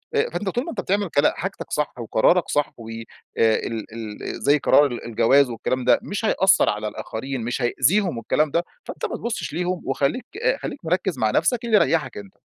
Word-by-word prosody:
آآ 450 +2 +2
فأنت 200 - -2
طول 245 +6 -1
ما - - -6
أنت - - -3
بتعمل 200 0 0
كلا 145 -1 +3
حاجتك 190 +2 -5
صح 150 - -1
وقرارك 120 +10 +2
صح، 145 0 0
وآآ 115 -1 -8 0.4
ال 110 0 +1
ال 110 -2 -6
زي 145 +1 +4
قرار 145 0 +5
ال 120 -4 -4
الجواز 125 +4 +3
والكلام 125 +2 -2
ده، - - +5
مش 205 +2 -3
هيأثر 190 -3 +4
على 105 +1 -2
الآخرين، 130 +5 -5
مش 120 +3 -3
هيأذيهم 150 - +2
والكلام 150 +6 0
ده، 170 - +1 0.2
فأنت - - -6
ما - - -3
تبُصّش 235 -8 -4
ليهم، 180 +2 -2
وخلّيك 140 - -1 0.2
آآ - - +2
خلّيك 240 - -7
مِركّز 180 -1 0
مع 110 -1 +2
نفسك، 245 - +1
اللي 230 -2 +2
يريحك 165 -6 +1
أنت. 100 -2 -10
145 Hz, 195 wpm, -23 LUFS, 115-190 Hz, 0.4 s, قرار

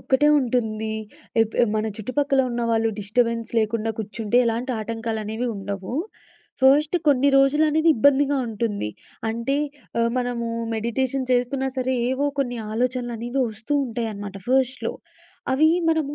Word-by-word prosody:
ఒక్కటే 280 +3 +3
ఉంటుంది. 220 -3 -1 0.5
ఎప్ 225 0 -4 0.2
మన 215 - 0
చుట్టుపక్కల 270 +5 +1
ఉన్న 240 0 -2
వాళ్ళు 225 0 +2
డిస్ట 205 +4 -5
బెన్స్ 230 -1 -4
లేకుండా 225 0 0
కూర్చుంటే 220 +2 0
ఎలాంటి 235 +3 -1
ఆటంకాలనేవి 225 +1 -3
ఉండవు. 195 +2 -5 0.7
ఫస్ట్ 290 +5 +5
కొన్ని 280 -1 +4
రోజులనేది 305 +3 +3
ఇబ్బందిగా 285 +3 +4
ఉంటుంది. 210 - -2 0.4
అంటే 235 +5 -1 0.4
ఆహ్, 230 0 +2
మనము 245 -1 -2 0.3
మెడిటేషన్ 255 +4 -1
చేస్తున్నా 250 +2 +1
సరే 260 0 0 0.2
ఏవో 270 +2 0
కొన్ని 245 -3 -2
ఆలోచనలనేవి 240 +1 -1
ఒస్తూ 220 +7 -4
ఉంటాయి 230 -1 -3
అనమాట. 200 -1 -7
ఫస్ట్‌లో 255 -2 +1 0.6
అవి 305 +4 +5 0.2
మనము 315 -3 +1
240 Hz, 125 wpm, -23 LUFS, 225-270 Hz, 0.7 s, ఫస్ట్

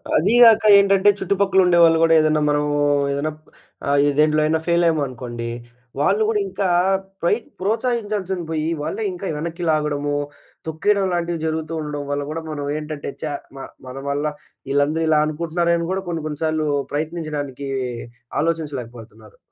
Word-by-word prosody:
అది 190 +9 +3
గాక 225 -2 +7 0.2
ఏంటంటే 195 0 +4
చుట్టుపక్కలుండే 190 -3 +2
వాళ్ళు 165 -1 +5
గూడా 165 0 +5
ఏదైనా 155 -1 +2
మనమూ 145 0 +1 0.3
ఏదైనా 145 +3 -1 0.6
ఆహ్, 140 0 +4 0.2
దేంట్లో 155 0 +4
అయిన 160 +1 +2
ఫెయిలయ్యామనుకోండి 130 -9 0 0.5
వాళ్ళు 200 +7 +2
గూడా 215 - +1
ఇంకా 195 0 -2 0.5
ప్రై 170 - +3 0.3
ప్రోత్సహించాల్సింది 205 -4 -1
బొయి 160 0 -1
వాళ్ళే 430 - -3
ఇంకా 360 - -6
వెనక్కి 170 +3 -5
లాగడము, 145 -1 -1 0.5
తొక్కేయడం 195 +5 +1
లాంటివి 170 -1 -1
జరుగుతూ 160 0 -3
ఉండడం 150 -1 -4
వల్ల 145 0 -1
గూడా 165 +1 -4
మనం 145 -1 -4
ఏంటంటే 150 -2 -5
చ - - -1 0.3
మ 135 - -7 0.2
మన 130 - -8
వల్ల 145 +1 -1 0.5
ఈళ్ళందరూ 145 +3 +1
ఇలా 155 - +4
అనుకుంటున్నారే 170 +2 0
అని 170 - -3
గూడా 190 0 -2
కొన్ని 165 -2 -3
కొన్ని 150 -1 -6
సార్లు 155 -1 0 0.3
ప్రయత్నించడానికీ 150 -3 -4 0.7
ఆలోచించలేకపోతున్నారు. 120 -9 -5
155 Hz, 140 wpm, -21 LUFS, 145-175 Hz, 0.7 s, గాక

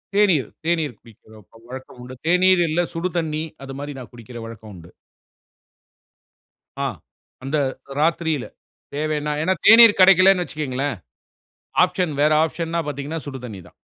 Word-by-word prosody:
தேநீர் 185 - +3 0.2
தேநீர் 160 -6 -1
குடிக்கிற 110 -1 -19 0.3
வழக்கம் 130 0 -10
உண்டு, 125 +1 -10
தேநீர் 180 0 +4
இல்லை 165 +3 0
சுடு 170 +1 -3
தண்ணீ 155 -2 -2 0.2
அது 135 - -8
மாரி 145 +1 -6
நான் 125 - -11
குடிக்கிற 120 0 -11
வழக்கம் 110 -2 -11
உண்டு. 85 -1 -14 1.9
ஆ - - 0 0.6
அந்த 135 +3 -1 0.4
ராத்திரியில, 160 -3 0 0.5
தேவைனா. 150 0 -2
ஏனா 185 +4 +1
தேநீர் 225 -1 +8
கிடைக்கலனு 185 0 +6
வச்சுக்கோங்களேன், 145 -4 -3 0.9
ஆப்ஷன் 180 -5 -2
வேற 150 +1 +4
ஆப்ஷன் 165 0 -4
ந 170 - +1
பார்த்தீங்கனா 145 +3 -5
சுடு 135 -3 -7
தண்ணீ 100 -4 -9
தான். - - -20
155 Hz, 135 wpm, -21 LUFS, 130-170 Hz, 1.9 s, தேநீர்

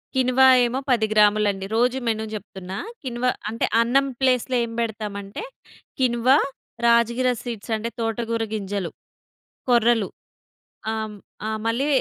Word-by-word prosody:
Quinoa 260 0 +4 0.2
ఏమో 245 +2 -1
10 225 -3 +3
గ్రాములండి. 210 -2 +3
రోజు 250 +3 +2
menu 220 -1 0
జెప్తున్నా. 190 -2 -7 0.3
కిన్వా 250 -1 -1 0.2
అంటే 230 - -1 0.2
అన్నం 270 +4 +3
ప్లేస్‌లో 255 -1 +2
ఏం 230 - -4
బెడతామంటే, 210 - -4 0.6
కిన్వా, 255 +1 +4 0.5
రాజగిర 235 +2 +3
సీడ్స్ 230 -2 -6
అంటే 225 +2 -3
తోటగూర 230 0 -1
గింజలు, 200 -4 -3 0.8
కొర్రలు 235 -3 +4 0.8
ఆహ్, 220 -1 -4 0.3
ఆహ్, 220 0 -1
మళ్ళీ 235 +5 +1
230 Hz, 115 wpm, -23 LUFS, 215-245 Hz, 0.8 s, కిన్వా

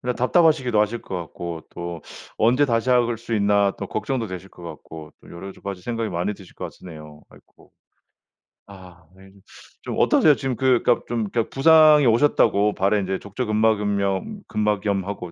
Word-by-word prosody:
그냥 125 0 -3
답답하시기도 130 -5 +2
하실 110 +2 -1
것 95 - -6
같고 85 -1 -7
또 85 -1 -7 0.4
'언제 125 +6 +3
다시 120 0 0
할 120 -2 +2
수 115 -1 -5
있나.' 100 -1 +2
또 - - -5
걱정도 115 +1 -3
되실 95 0 -8
것 90 - -17
같고 80 -1 -10
또 - - -17
여러 95 +3 -9
가지 95 -2 -6
생각이 115 0 -3
많이 90 +4 -2
드실 95 -3 -16
거 - - -7
같으네요. 75 -3 -11
아이코. - - -22 1.0
아 90 -4 -15
이 95 0 -17 0.5
좀 - - -5
어떠세요? 150 -3 +4
지금 135 -3 -3
그니까 125 -2 +2
좀 115 -4 -2
그니까 115 0 -2
부상이 155 0 +5
오셨다고 110 -4 +3
발에 100 +2 +1
이제 95 0 -3
족저근막은염 105 - -1
근막염하고 100 -3 -2
105 Hz, 350 characters per minute, -22 LUFS, 95-120 Hz, 1.0 s, 부상이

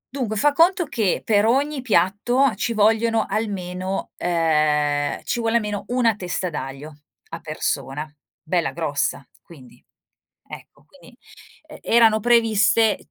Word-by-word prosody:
Dunque 235 -5 -2
fa 295 +8 +3
conto 345 +3 +3
che 220 - -1
per 205 -2 +3
ogni 275 +3 0
piatto 225 +5 +1
ci 230 +3 -3
vogliono 225 +1 +2
almeno 190 -3 -4
ehm, 150 -4 0
ci 240 - -2
vuole 230 0 +1
a - - +2
meno 210 -2 -5
una 240 -3 +1
testa 180 -1 -4
d'aglio 145 +1 -7 0.4
a 165 - -7
persona, 155 -1 -4 0.4
bella 170 0 -1
grossa, 145 -4 -2
quindi 135 -7 -17 0.6
ecco, - - -13
quindi 255 -3 -19 0.5
e 300 - -12
erano 225 -2 +4
previste 225 -1 +2
210 Hz, 130 wpm, -22 LUFS, 165-235 Hz, 0.6 s, erano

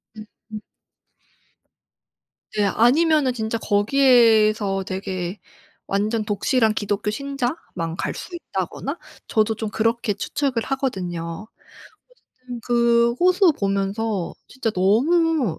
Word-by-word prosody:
음 215 -1 -9 0.3
음. 215 -1 -6 1.9
네. 210 - +1
아니면은 270 - +3
진짜 220 -1 -2
거기에서 215 -3 +3
되게 185 0 -4 0.5
완전 215 +3 0
독실한 220 +2 +1
기독교 205 0 -2
신자만 245 - -4
갈 - - -2
수 360 - -9
있다거나 340 - -4 0.3
저도 220 0 +1
좀 220 0 -4
그렇게 225 +1 0
추측을 250 +3 -2
하거든요. 185 -9 -3 0.6
어쨌든 255 - -12
그 235 -1 +3
호수 365 0 +5
보면서 200 0 -1
진짜 260 -4 -2
너무 255 - +2
220 Hz, 225 characters per minute, -22 LUFS, 200-255 Hz, 1.9 s, 호수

